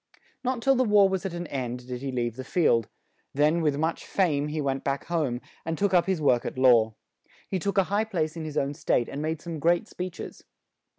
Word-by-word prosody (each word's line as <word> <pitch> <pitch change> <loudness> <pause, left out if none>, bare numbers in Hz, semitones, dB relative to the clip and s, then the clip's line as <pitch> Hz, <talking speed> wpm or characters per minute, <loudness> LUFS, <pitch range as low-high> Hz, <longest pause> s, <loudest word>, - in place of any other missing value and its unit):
Not 250 -2 -1
till 270 - +5
the 255 -1 +3
war 210 -4 +5
was 190 0 -1
at 180 - -7
an 175 0 -4
end, 125 -4 -4
did 125 -1 -5
he 135 -1 -3
leave 120 -2 -2
the 130 - -6
field; 120 - +2 0.5
then 150 +4 +3
with 150 -3 +1
much 160 +2 -1
fame, 150 -7 +1
he 150 +1 -3
went 135 -2 -1
back 140 0 -2
home, 145 -8 -1 0.2
and 165 0 -3
took 200 +1 +1
up 175 -1 +4
his 190 -3 +1
work 125 -5 +3
at - - -5
law. 115 -4 +5 0.5
He 190 - -2
took 200 +2 -2
a 195 - +6
high 205 +4 0
place 165 -7 -2
in 165 - -5
his 155 -1 -5
own 140 0 0
state 120 -4 0
and 140 - -5
made 160 0 -3
some 170 -2 -5
great 170 +3 +2
speech 180 -1 -6
es. - - -8
155 Hz, 235 wpm, -27 LUFS, 135-185 Hz, 0.5 s, a